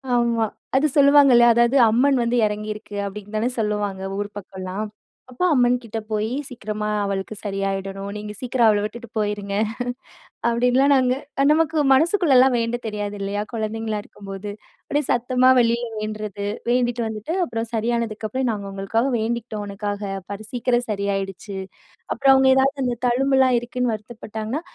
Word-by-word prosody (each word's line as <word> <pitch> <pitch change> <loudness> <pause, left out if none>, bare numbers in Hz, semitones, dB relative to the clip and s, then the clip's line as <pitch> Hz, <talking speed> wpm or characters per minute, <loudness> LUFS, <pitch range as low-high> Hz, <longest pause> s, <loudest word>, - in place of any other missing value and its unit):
ஆமா, 235 -2 +2 0.3
அது 295 +3 +4
சொல்லுவாங்க 280 -1 +7
இல்லையா, 240 0 +7
அதாவது, 235 +3 +3 0.2
"அம்மன் 265 +3 +3
வந்து 240 +1 +1
எறங்கி 210 +1 -4
இருக்கு' 205 -1 -9
அப்டின்னு 210 +1 -8
தானே 235 +3 +1
சொல்லுவாங்க 205 -3 -1 0.2
ஊர் 205 0 -3
பக்கம்லாம். 190 +2 -6 0.4
அப்போ 360 +9 -1
அம்மன் 245 -2 +4
கிட்ட 225 0 -5
போயி, 215 +3 -1 0.2
சீக்ரமா 215 -3 -4 0.2
அவளுக்கு 195 +2 -3
சரியாயிடணும், 195 0 -3
நீங்க 210 0 -6
சீக்கிரம் 245 -2 +2
அவள 205 -1 +3
விட்டுட்டு 235 +2 -6
போயிருங்க, 205 -1 -2 0.9
அப்டின்னுலாம் 250 +4 +3
நாங்க 255 -1 +3 0.4
நமக்கு 320 0 +2
மனசுக்குள்ளலாம் 270 -4 +4
வேண்ட 230 +1 -1
தெரியாது 205 -1 -3
இல்லையா, 200 +1 -2
குழந்தைகளா 220 -1 -2
இருக்கும்போது. 195 0 -8 0.4
அப்டியே 290 -1 0
சத்தமா 250 +1 +3
வெளில 235 0 +2
வேண்டுறது, 215 -1 -4 0.2
வேண்டிட்டு 245 -1 +1
வந்துட்டு, 220 - -4
அப்புறம் 225 -5 -4
சரியானதுக்கு 225 -1 -1
அப்புறம், 260 +1 -1
"நாங்க 200 -2 -5
உங்களுக்காக 195 +6 -1
வேண்டிக்கிட்டோம் 220 -2 -3
உனக்காக, 205 0 -4 0.2
பாரு 205 +2 -6
சீக்கிரம் 245 0 0
சரியாயிடுச்சு." 195 -1 -3 0.6
அப்புறம் 270 -1 +5
அவங்க 265 0 +5
ஏதாவது, 270 +2 +2
அந்த 245 -1 -1
தழும்புலாம் 260 0 +3
இருக்குன்னு 245 -1 -1
வருத்தப்பட்டாங்கன்னா, 220 +4 -6
225 Hz, 140 wpm, -22 LUFS, 205-250 Hz, 0.9 s, சொல்லுவாங்க